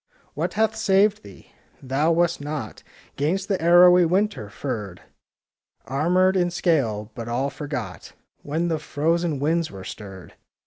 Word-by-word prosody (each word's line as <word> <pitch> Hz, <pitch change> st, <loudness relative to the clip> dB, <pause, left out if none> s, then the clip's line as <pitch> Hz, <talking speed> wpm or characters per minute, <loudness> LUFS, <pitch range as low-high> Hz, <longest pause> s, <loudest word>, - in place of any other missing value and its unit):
What -, -, -3 dB
hath 220 Hz, +1 st, +1 dB
saved 205 Hz, -1 st, +2 dB
thee? 100 Hz, -2 st, -15 dB, 0.3 s
Thou 140 Hz, +5 st, 0 dB
wast 170 Hz, -1 st, +1 dB
not 145 Hz, -7 st, -6 dB, 0.4 s
'Gainst 185 Hz, +7 st, -1 dB
the 195 Hz, -4 st, 0 dB
arrowy 175 Hz, +1 st, +7 dB
winter 185 Hz, -, 0 dB
furred,— 105 Hz, -7 st, -6 dB, 0.8 s
Armed 180 Hz, +7 st, +2 dB
in 175 Hz, -2 st, +2 dB
scale,— 135 Hz, -, 0 dB
but 115 Hz, -1 st, -7 dB
all 130 Hz, +4 st, -1 dB
forgot 145 Hz, -1 st, -6 dB, 0.3 s
When 160 Hz, +4 st, -2 dB
the 160 Hz, -2 st, -1 dB
frozen 160 Hz, +1 st, -1 dB
winds 165 Hz, +3 st, 0 dB
were 95 Hz, -1 st, -10 dB
stirred. 95 Hz, -2 st, -10 dB
160 Hz, 135 wpm, -23 LUFS, 130-180 Hz, 0.8 s, arrowy